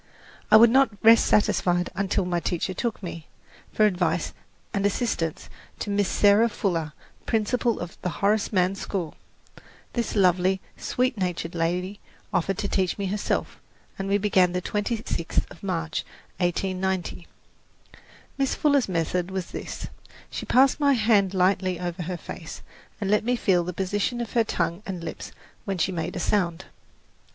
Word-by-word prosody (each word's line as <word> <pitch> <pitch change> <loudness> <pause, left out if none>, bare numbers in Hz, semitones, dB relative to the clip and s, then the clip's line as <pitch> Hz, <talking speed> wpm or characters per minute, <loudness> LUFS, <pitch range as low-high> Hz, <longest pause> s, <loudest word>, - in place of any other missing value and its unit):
I - - +9
would 230 +1 +7
not 270 +2 +5
rest 225 +1 +7
satisfied 180 -4 +2
until 195 -1 0
my 175 -1 0
teacher 175 +2 -2
took 220 +2 -3
me, 165 -3 -7 0.4
for 215 - +3
advice 190 -3 0 0.4
and 200 - 0
assistance, 200 - -1 0.3
to 205 - -4
Miss 200 -1 +2
Sarah 210 +3 +5
Fuller, 165 -8 -2 0.3
principal 230 +1 +1
of 175 0 -8
the 180 - -1
Horace 200 +5 +1
Mann 185 -2 +2
School. 190 -5 -4 0.8
This 235 -2 -2
lovely, 185 -1 +3 0.2
sweet 250 -3 -1
natured 180 -2 -2
lady 180 +4 -1 0.3
offered 185 +1 0
to 200 - -2
teach 190 -2 0
me 200 - -2
herself, 200 +2 -2 0.4
and 195 - -2
we 200 - +3
began 190 -3 +3
the 180 - 0
twenty 210 +4 -2
sixth 170 - -1
of - - -13
March, 165 -5 -2 0.4
1890. 185 0 -1 1.1
Miss 270 -1 +1
Fuller's 285 -7 +2
method 175 +1 -1
was 190 -2 -4
this: - - -6 0.5
she - - -5
passed 265 +3 +4
my 285 -1 +4
hand 210 -5 +3
lightly 185 -1 +2
over 175 0 -4
her 175 +1 -3
face, - - -9 0.4
and 200 -2 -1
let 210 - +3
me 245 +2 +1
feel 185 -7 +2
the 180 - -3
position 205 +6 -1
of 235 -2 -4
her 235 - +4
tongue 170 -3 -2
and 180 -3 -5
lips - - -6 0.3
when 195 -3 -2
she 180 +3 +1
made 175 0 -3
a - - -2
sound. 175 -2 0
190 Hz, 160 wpm, -25 LUFS, 180-210 Hz, 1.1 s, I